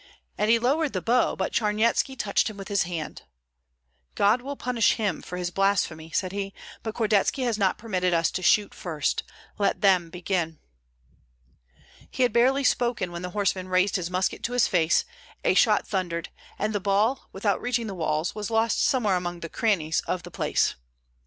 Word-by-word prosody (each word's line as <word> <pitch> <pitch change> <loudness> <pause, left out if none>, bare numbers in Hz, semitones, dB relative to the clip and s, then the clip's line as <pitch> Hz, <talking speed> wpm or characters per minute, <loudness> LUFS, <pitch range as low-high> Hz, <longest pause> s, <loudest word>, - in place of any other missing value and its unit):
And 210 - 0
he 230 - +6
lowered 275 +5 +1
the 185 - 0
bow; 240 +7 +2
but - - -2
Charnyetski 225 +4 +1
touched 210 0 +1
him 215 - -10
with 195 +1 -8
his 200 -3 +1
hand, 165 -3 -5 0.9
"God 210 +5 +3
will 280 +3 -5
punish 245 -4 +2
him 205 -6 -2
for 180 - -7
his 180 -1 -3
blasphemy," 180 -5 0
said 185 +3 -1
he; 195 0 -4 0.3
"but 220 -1 -5
Kordetski 220 +4 +1
has 240 -3 +1
not 195 -2 +2
permitted 185 -5 -1
us 165 -1 +2
to 185 - -3
shoot 205 +3 +3
first, 160 -5 -2 0.4
let 200 - +1
them 185 -4 +4
begin." 175 -2 -2 1.5
He 255 - 0
had 245 -3 +2
barely 265 +4 +3
spoken 240 -8 +1
when 170 0 -6
the 180 - -4
horseman 190 -1 -1
raised 185 +2 +2
his 180 -3 -1
musket 185 +1 -1
to 245 - -3
his 245 -1 +3
face; 165 -2 +2 0.4
a - - +3
shot - - +3
thundered, 175 -4 -2 0.3
and 215 +1 -1
the 205 - 0
ball, 205 +6 +1
without 200 +1 -1
reaching 240 -1 -1
the 205 - -5
walls, 160 -1 -1
was 210 0 -4
lost 225 0 +1
somewhere 215 -8 +2
among 175 -1 -4
the 165 - -6
crannies 170 -9 0
of 180 -1 -2
the 175 - -10
place. - - +1
200 Hz, 185 wpm, -26 LUFS, 180-225 Hz, 1.5 s, he